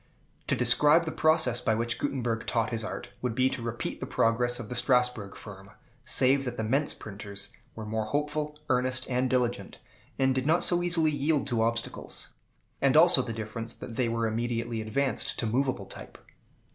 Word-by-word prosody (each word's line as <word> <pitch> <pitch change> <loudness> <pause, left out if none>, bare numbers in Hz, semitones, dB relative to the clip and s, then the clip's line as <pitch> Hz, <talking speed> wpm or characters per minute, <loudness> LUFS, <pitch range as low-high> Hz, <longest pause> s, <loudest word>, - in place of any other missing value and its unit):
To - - +1
describe 150 +3 +5
the 160 - -3
process 155 -7 +2
by 110 -3 +1
which 115 +1 -1
Gutenberg 120 -4 -2
taught 115 -1 0
his 115 -1 -2
art, 110 - -6
would 125 -3 -2
be 130 +1 +2
to - - -4
repeat 115 0 -4
the - - -5
progress 120 +2 +1
of 115 - -7
the 125 - -5
Strasbourg 125 -4 +1
firm, 100 -2 -11 0.3
save 135 +2 +5
that 125 - -4
the 110 - -2
Mentz 135 +7 0
printers 100 -1 -8 0.2
were 110 - -7
more 110 0 -2
hopeful, 150 +4 -2
earnest, 130 -1 +1
and 125 +1 +1
intelligent, 125 -2 -1 0.4
and 130 0 +2
did 130 +1 -1
not 165 +3 +3
so 175 0 +4
easily 165 -3 +2
yield 145 0 0
to 115 -2 0
obstacles; 115 +1 -2 0.5
and - - +4
also - - +7
the - - -5
difference 115 +1 -6
that 115 - -9
they 125 -1 0
were 115 0 -1
immediately 115 0 -2
advanced 130 +5 -2
to - - -2
movable 125 -2 -1
type. 95 - -10
120 Hz, 185 wpm, -28 LUFS, 115-135 Hz, 0.5 s, also